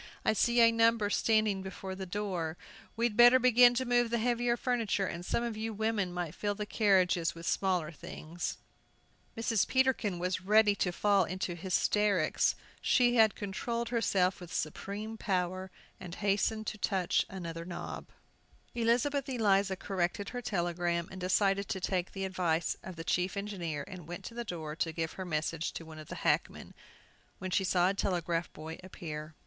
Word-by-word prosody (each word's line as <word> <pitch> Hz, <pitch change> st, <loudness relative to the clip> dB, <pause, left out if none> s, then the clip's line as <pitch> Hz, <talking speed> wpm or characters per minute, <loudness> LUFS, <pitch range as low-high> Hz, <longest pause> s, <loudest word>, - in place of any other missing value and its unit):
I -, -, +4 dB
see 235 Hz, +3 st, +3 dB
a 230 Hz, 0 st, +7 dB
number 230 Hz, -2 st, +3 dB
standing 215 Hz, -4 st, +2 dB
before 190 Hz, 0 st, -6 dB
the 190 Hz, 0 st, -6 dB
door. 180 Hz, -4 st, -3 dB, 0.4 s
We'd 230 Hz, -1 st, 0 dB
better 240 Hz, +2 st, +8 dB
begin 245 Hz, -1 st, +6 dB
to 260 Hz, +1 st, 0 dB
move 240 Hz, -1 st, +2 dB
the 235 Hz, -, +1 dB
heavier 240 Hz, +1 st, +1 dB
furniture, 230 Hz, -6 st, 0 dB
and 175 Hz, -1 st, -5 dB
some 235 Hz, -, -1 dB
of 235 Hz, -2 st, -3 dB
you 220 Hz, +1 st, -3 dB
women 215 Hz, -3 st, 0 dB
might 175 Hz, -3 st, -4 dB
fill 205 Hz, +2 st, -2 dB
the 210 Hz, 0 st, -4 dB
carriages 185 Hz, -6 st, +2 dB
with 165 Hz, 0 st, -9 dB
smaller 180 Hz, -5 st, 0 dB
things." 165 Hz, +2 st, -6 dB, 0.8 s
Mrs. 225 Hz, -2 st, +1 dB
Peterkin 260 Hz, -8 st, +1 dB
was 180 Hz, +1 st, -1 dB
ready 210 Hz, +2 st, +5 dB
to 190 Hz, -2 st, 0 dB
fall 200 Hz, +1 st, +3 dB
into 185 Hz, 0 st, -3 dB
hysterics. 190 Hz, 0 st, +1 dB, 0.3 s
She 245 Hz, -2 st, +4 dB, 0.2 s
controlled 230 Hz, +4 st, -3 dB
herself 195 Hz, -6 st, +1 dB
with 175 Hz, -, -9 dB
a -, -, -7 dB
supreme 205 Hz, +8 st, -4 dB
power, 185 Hz, -1 st, -1 dB, 0.3 s
and 180 Hz, -2 st, -8 dB
hastened 210 Hz, +2 st, 0 dB
to 215 Hz, -, -4 dB
touch 190 Hz, -4 st, +1 dB
another 170 Hz, -3 st, -6 dB
knob. 175 Hz, 0 st, -6 dB, 0.7 s
Elizabeth 245 Hz, +4 st, +1 dB
Eliza 200 Hz, -6 st, +2 dB
corrected 190 Hz, +1 st, -2 dB
her 245 Hz, -, -5 dB
telegram, 175 Hz, -4 st, -1 dB
and 190 Hz, -1 st, -8 dB
decided 195 Hz, +2 st, +2 dB
to 190 Hz, -, -2 dB
take 185 Hz, -1 st, -1 dB
the 195 Hz, -1 st, -3 dB
advice 175 Hz, -3 st, 0 dB
of 185 Hz, -, -8 dB
the 165 Hz, -, -6 dB
chief 180 Hz, +3 st, 0 dB
engineer 175 Hz, -8 st, -4 dB
and 180 Hz, -4 st, -9 dB
went 175 Hz, +1 st, -7 dB
to -, -, -7 dB
the 240 Hz, 0 st, -4 dB
door 160 Hz, -7 st, -5 dB
to 165 Hz, -, 0 dB
give 160 Hz, 0 st, -3 dB
her 190 Hz, -, -6 dB
message 160 Hz, 0 st, -2 dB
to 165 Hz, -, -7 dB
one 160 Hz, -1 st, -10 dB
of 155 Hz, -, -10 dB
the -, -, -7 dB
hackmen, -, -, 0 dB, 0.6 s
when 185 Hz, 0 st, -5 dB
she 190 Hz, -, +2 dB
saw 180 Hz, -1 st, +3 dB
a 190 Hz, -, +2 dB
telegraph 175 Hz, -3 st, -1 dB
boy 160 Hz, +1 st, -8 dB
appear. 155 Hz, -4 st, -7 dB
190 Hz, 175 wpm, -31 LUFS, 175-220 Hz, 0.8 s, better